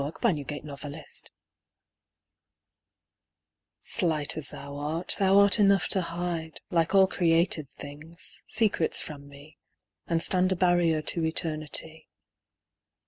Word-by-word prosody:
94 150 +6 -1
Sonnets 145 -1 -6
TO - - -5
A - - -6
DAISY 155 +2 -9 2.8
SLIGHT 160 -8 +2
as 150 -2 -1
thou 140 0 -8
art, 155 +4 -1
thou 195 0 +3
art 200 +2 +5
enough 195 -2 +3
to 190 - +1
hide 170 -2 -4
Like 170 +2 +1
all 190 -1 +7
created 165 -5 0
things, 150 +4 -4
secrets 215 -7 +3
from 140 -2 -10
me, 140 +2 -16 0.5
And 165 -1 0
stand 185 +2 +3
a - - +1
barrier 175 -3 +1
to 165 +2 -2
eternity. 160 0 -3
165 Hz, 125 wpm, -27 LUFS, 150-180 Hz, 2.8 s, all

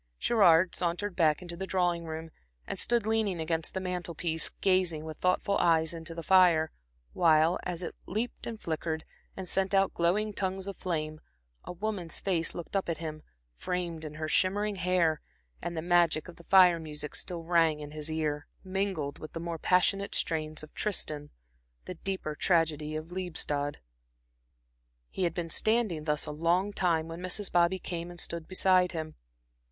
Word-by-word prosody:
Gerard 185 - +4
sauntered 175 +3 -1
back 160 0 +3
into 170 -1 -5
the 190 +2 -5
drawing 175 -3 +1
room, 160 0 -6 0.3
and - - -4
stood 235 -3 +3
leaning 220 -5 +1
against 160 +1 -1
the - - 0
mantel 180 -2 -4
piece, 160 -1 +1
gazing 185 -5 +1
with 155 -1 -7
thoughtful 185 +2 +1
eyes 165 -1 +3
into 165 0 -6
the 165 - -5
fire, 175 -3 +5 0.4
while, 165 0 +4
as 180 0 -3
it - - -4
leaped 220 +6 -3
and 225 -2 -5
flickered, 160 -2 -3 0.3
and 190 -1 -5
sent 195 +2 +1
out 195 0 +3
glowing 205 +5 +1
tongues 190 -1 -2
of 200 - -4
flame, 155 -3 -3 0.4
a - - -5
woman's 180 -2 -2
face 170 -4 -1
looked 175 +3 -7
up 195 -3 0
at 165 - -1
him 155 -1 -6 0.3
framed 170 - -3
in 155 -1 -7
her 155 0 -3
shimmering 200 +5 +1
hair, 180 -3 +2 0.4
and 170 -1 -4
the 160 - -2
magic 170 -2 +3
of 175 - -11
the 170 - -15
fire 180 -3 +6
music 150 -2 -5
still 170 -2 -3
rang 165 -2 +3
in 150 -1 -8
his 155 0 -4
ear, 155 -2 -2 0.2
mingled 190 -6 -2
with 155 - -9
the 165 - -4
more 170 -1 -4
passionate 195 +3 +2
strains 155 -2 -1
of 155 - -12
Tristan, 155 -8 -1 0.6
the - - -5
deeper 185 -3 -4
tragedy 155 -2 +1
of 155 +2 -6
Liebestod. 160 -5 -1 1.3
He 185 - -1
had 170 -1 -1
been 170 -2 -3
standing 215 -9 +1
thus 150 -1 0
a - - -5
long 175 +6 +1
time 165 -4 +1
when 165 +1 -7
Mrs. 185 +3 -3
Bobby 175 +2 +3
came 170 -1 -5
and 175 0 -10
stood 170 -1 -3
beside 185 -1 +3
him. 155 -1 -4
170 Hz, 175 wpm, -30 LUFS, 160-185 Hz, 1.3 s, fire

